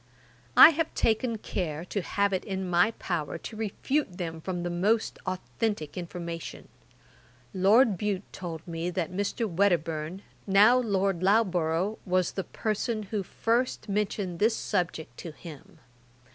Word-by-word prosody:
I - - +12
have 325 0 -1
taken 225 +1 +1
care 170 -6 -4
to 200 +2 -2
have 200 +2 0
it 185 - -1
in 190 -2 -3
my 175 +4 +4
power 165 -5 -3
to 225 - -8
refute 220 +1 -2
them 165 -3 -5
from 175 0 -3
the 175 - -2
most 210 +6 +1
authentick 185 -3 -3
information. 170 -2 -6 0.8
Lord 200 +2 +4
Bute 205 -2 -1
told 165 -3 -7
me, 165 +1 -3
that 180 -1 -2
Mr. 205 +4 -1
Wedderburne, 170 -2 0 0.2
now 210 +6 +6
Lord 195 -6 0
Loughborough, 185 -1 +2
was 185 -2 +1
the 195 - -3
person 215 0 -2
who 210 - +1
first 230 +7 -1
mentioned 200 -3 -2
this 220 +2 +3
subject 165 - -2
to 165 - -7
him. 155 -3 -12
190 Hz, 140 wpm, -28 LUFS, 175-215 Hz, 0.8 s, I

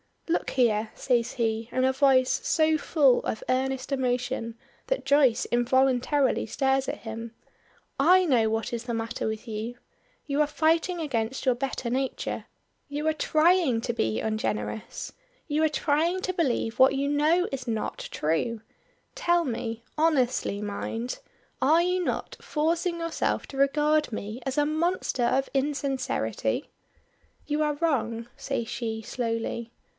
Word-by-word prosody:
"Look 335 - 0
here!" 220 -4 +2
says 240 -2 0
he, 225 -1 -1
in 255 - +1
a 260 0 +3
voice 265 -2 +3
so 315 -1 +3
full 285 -4 +3
of 220 - -3
earnest 260 +1 -1
emotion 250 -3 -1 0.3
that - - -1
Joyce 275 -4 +4
involuntarily 260 +2 +2
stares 270 +3 +1
at - - -3
him; 225 0 -7 0.6
"I 365 +6 +6
know 240 -8 +3
what 225 +1 -2
is 235 0 -3
the 240 - -3
matter 225 +1 -3
with 220 +2 -4
you. 225 +2 -4 0.5
You 285 +1 +1
are 300 - +3
fighting 330 +4 +1
against 255 -4 -2
your 255 - +4
better 255 -1 -3
nature. 260 +2 -2 0.4
You 295 +1 -4
are 315 - +3
trying 310 -5 +3
to 235 - -2
be 110 - 0
ungenerous. 105 - -3 0.4
You 305 0 +1
are 315 - +4
trying 310 +5 +1
to 370 - -2
believe 255 -9 0
what 265 +1 +6
you 275 +1 0
know 310 +5 +3
is 265 -2 -5
not 220 -2 -2
true. 185 +9 -1 0.5
Tell 345 -9 +2
me 230 -4 -4
honestly 260 -9 +1
mind 225 +4 -4 0.4
are 315 +6 +5
you 360 +1 +1
not - - -3
forcing 335 +3 0
yourself 335 0 -1
to 270 - -9
regard 295 +1 +2
me 215 +3 -5
as 265 - -2
a 295 - +4
monster 315 -3 0
of 265 +3 +1
insincerity?" 275 -1 -1 0.7
"You 295 +1 -1
are 300 -1 +1
wrong," 235 -7 -1
says 275 -4 -3
she, 220 -2 -3
slowly. 230 0 -3
265 Hz, 145 wpm, -27 LUFS, 230-300 Hz, 0.7 s, I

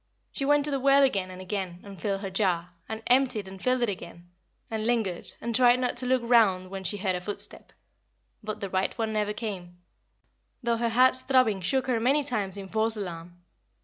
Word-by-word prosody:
She 275 - -2
went 290 0 +3
to 295 - -1
the 275 - 0
well 275 +1 +5
again 195 -8 +1
and 185 0 -9
again 185 -2 -4
and 195 -4 -11
filled 195 -2 -1
her 195 -2 -5
jar, 180 -3 0 0.2
and 220 0 -5
emptied 250 -5 +2
and 190 0 -10
filled 255 -1 +1
it - - +2
again, 175 -2 -8 0.4
and 220 -1 -2
lingered, 220 -7 0
and 235 0 -3
tried 245 0 +6
not 250 -1 -1
to 250 +1 -1
look 255 -1 +2
round 195 -6 +3
when 195 -1 -5
she 190 +3 -2
heard 190 -1 0
a 180 - -3
footstep; 205 +3 -4 0.7
but 215 0 -5
the 200 - -3
right 190 +4 -1
one 220 -2 -1
never 210 -1 0
came, 190 -5 -6 0.9
though 235 -1 +1
her 235 0 0
heart's 255 +2 +5
throbbing 255 -8 +2
shook 260 +8 +1
her 250 -3 0
many 275 +6 +2
times 205 -8 -2
in 195 -1 -7
false 220 +2 0
alarm. 175 -2 -7
215 Hz, 210 wpm, -27 LUFS, 190-245 Hz, 0.9 s, tried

